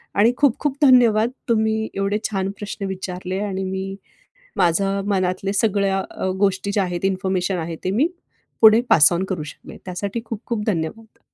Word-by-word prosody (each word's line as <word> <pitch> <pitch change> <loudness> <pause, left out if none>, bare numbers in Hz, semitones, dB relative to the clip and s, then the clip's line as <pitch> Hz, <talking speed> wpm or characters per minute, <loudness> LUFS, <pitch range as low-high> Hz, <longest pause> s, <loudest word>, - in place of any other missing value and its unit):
आणि 225 +4 +4
खूप 280 -5 +3
खूप 290 -2 -1
धन्यवाद 240 -5 +5 0.2
तुम्ही 220 -1 +1
एवढे 195 +1 0
छान 195 -1 -1
प्रश्न 205 -1 -5
विचारले 185 0 -4
आणि 195 -2 -3
मी 190 +1 -4 0.6
माझं 195 +3 +1
मनातल्या 190 0 0
सगळ्या 200 -2 +1
अ, - - -4
गोष्टी 195 0 +1
ज्या 205 - +2
आहेत, 180 0 -4
इन्फॉर्मेशन 190 -1 0
आहे 165 0 -4
ते 185 - 0
मी 250 - +2 0.5
पुढे 220 +1 +8
पास 155 +2 +7
ऑन 175 - 0
करू 180 -5 -3
शकले 150 - -11
त्यासाठी 200 +5 -4
खूप 220 -2 -5
खूप 225 -3 -2
धन्यवाद! 215 +3 -3
195 Hz, 165 wpm, -21 LUFS, 185-215 Hz, 0.6 s, पुढे